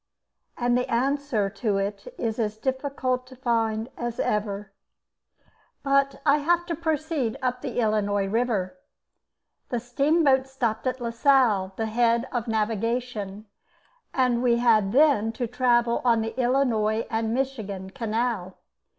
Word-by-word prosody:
and 245 0 +1
the 250 0 0
answer 265 -3 0
to 200 +1 -1
it 195 0 -3
is 225 -1 -2
as 215 -1 -1
difficult 260 0 -2
to 260 - -13
find 225 -3 0
as 240 -1 -4
ever. 205 -1 -1 1.1
But 275 0 +1
I 290 0 +5
have 345 +4 +1
to 340 -1 -3
proceed 310 -6 -1
up 250 -2 -2
the - - -5
Illinois 205 -3 +1
river. 225 +1 -1 0.9
The 245 - -1
steamboat 275 +2 +2
stopped 240 -3 -2
at 255 0 -2
Lasalle, 235 -5 +2
the 225 - -2
head 235 +2 +2
of 240 -3 -2
navigation, 220 -1 -2 0.7
and 250 -2 +1
we 240 -2 +3
had 220 -5 +3
then 255 -5 +4
to 240 +2 -2
travel 240 0 +2
on 235 -2 +3
the 225 - -5
Illinois 240 -4 +1
and 225 0 0
Michigan 220 -7 -3
canal. 220 -4 -2
235 Hz, 135 wpm, -25 LUFS, 215-260 Hz, 1.1 s, I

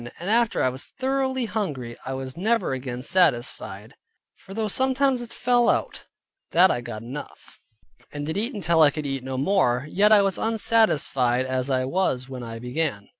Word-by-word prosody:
And 180 +5 -3
after 230 0 +2
I 130 - +3
was 130 +1 -6
thoroughly 265 -1 0
hungry, 145 - -4
I 135 - -2
was 130 -1 -6
never 220 -3 0
again 125 -1 -5
satisfied. 150 -8 0 0.4
For 195 - -12
though 220 -1 -1
sometimes 265 +3 +1
it 240 - -8
fell 245 -1 +2
out, - - -1 0.5
that 180 +3 +6
I 120 - -1
got 115 -3 -7
enough, 135 +5 -9 0.5
and 145 0 -5
did 160 - -3
eat 220 +2 -1
till 165 0 +3
I 150 - +7
could 150 +1 -5
eat 135 -2 -3
no 130 0 -4
more, 140 -5 +2
yet 205 +6 +3
I 205 -2 +7
was 195 -2 0
as - - -2
unsatisfied 150 - +2
as 130 0 -2
I 130 -1 +1
was 130 -5 -1
when 130 -2 -7
I 115 -1 -7
began. 125 -3 -3
155 Hz, 185 wpm, -24 LUFS, -, 0.5 s, I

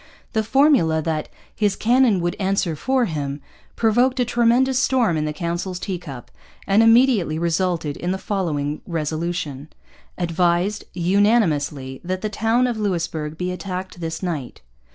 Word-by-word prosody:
The 220 - +2
formula 230 - +3
that 155 -1 -2 0.3
'his 205 -2 +1
cannon 235 -4 +3
would 175 0 -1
answer 190 -4 0
for 260 - +1
him' 145 -5 -4 0.4
provoked 245 +4 +2
a 250 - +3
tremendous 245 +2 +2
storm 250 -9 +2
in 155 -1 -1
the 150 - -2
council's 175 +3 -3
teacup 175 - -6 0.3
and 200 +3 +4
immediately 225 -8 +4
resulted 170 -2 -1
in 175 - -3
the 190 - -1
following 155 -8 -2
resolution: 155 -3 -3 0.5
'Advised, 175 +3 0
Unanimously, 170 - +1
that 185 +1 -3
the 215 - -2
Towne 225 +4 +1
of 240 -3 -2
Louisbourg 165 -6 -2
be 180 +1 -2
Attacked 185 -1 -6
this 165 +2 -4
Night.' 155 -9 -4
180 Hz, 140 wpm, -22 LUFS, 160-220 Hz, 0.5 s, and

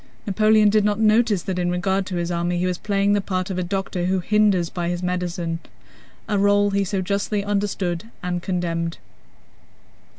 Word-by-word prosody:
Napoleon 215 +1 +4
did 215 0 +3
not 205 0 +1
notice 220 -3 +3
that 185 -1 -3
in 175 0 0
regard 190 +2 0
to 185 - -4
his 175 0 -2
army 175 +1 -1
he 180 - 0
was 180 -1 -1
playing 200 -1 +1
the 205 - +2
part 185 -1 -2
of 185 - -2
a - - 0
doctor 185 -1 -2
who 190 +1 +1
hinders 200 -3 +2
by 175 -1 -2
his 175 +1 -3
medicines—a 180 +3 -4
role 205 0 +3
he 200 0 +1
so 195 0 -2
justly 200 +2 -1
understood 200 -3 -1 0.2
and 180 -1 -2
condemned. 170 -2 -2
190 Hz, 175 wpm, -22 LUFS, 175-205 Hz, 0.2 s, Napoleon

